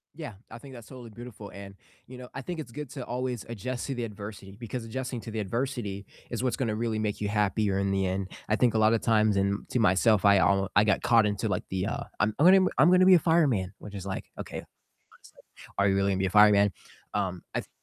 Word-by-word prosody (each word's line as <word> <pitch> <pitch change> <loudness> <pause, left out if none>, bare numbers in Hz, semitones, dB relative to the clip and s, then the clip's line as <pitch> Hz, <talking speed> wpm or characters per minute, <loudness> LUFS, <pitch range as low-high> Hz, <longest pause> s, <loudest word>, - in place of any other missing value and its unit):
Yeah, 155 -8 -7 0.2
I - - -9
think 135 +2 -12
that's 115 -3 -11
totally 125 -3 -11
beautiful, 110 -2 -10
and 100 0 -11 0.3
you 125 0 -11
know, 125 - -9
I 135 - -5
think 165 +4 -6
it's 120 -6 -7
good 150 0 -7
to 130 -4 -6
always 125 -2 -3
adjust 120 +3 -4
to 135 - -3
the 120 - -3
adversity 100 -2 -8
because 120 +1 -5
adjusting 125 +1 -5
to 115 - -8
the 110 - -3
adversity 105 -2 -3 0.3
is 120 +1 -3
what's 125 - 0
gonna 115 -5 -1
really 115 0 -2
make 105 -1 -2
you 105 - -1
happier 105 -1 0
in 100 0 0
the 95 -1 0
end. 95 0 -3 0.2
I 105 - +3
think 120 0 +2
a 110 - +1
lot 110 +1 +4
of 115 - +1
times, 110 -2 +2
and 100 +1 -1
to 125 - 0
myself, 105 +1 +3
I 100 -1 +6
al 95 +2 +2
I 100 - +6
got 105 - +2
caught 115 -3 +4
into 105 -1 -2
like - - -1
the, 95 +2 -2
uh, - - -3 0.2
"I'm 105 0 +2
I'm 155 - +4
gonna 190 0 +7
I'm 150 - +7
gonna 185 0 +5
be 190 - +7
a 180 - +7
fireman," 135 - +2
which 105 - -11
is 100 -2 -7
like, 95 -1 -4
"Okay, - - -6 0.5
honestly, - - -21 0.4
are 100 0 +3
you 95 - +2
really 100 0 +1
gonna 95 - -1
be 95 - +1
a - - -2
fireman?" 105 0 +5 0.4
Um, 95 -3 -2
I - - 0
th - - -14
110 Hz, 250 wpm, -28 LUFS, 100-125 Hz, 0.5 s, gonna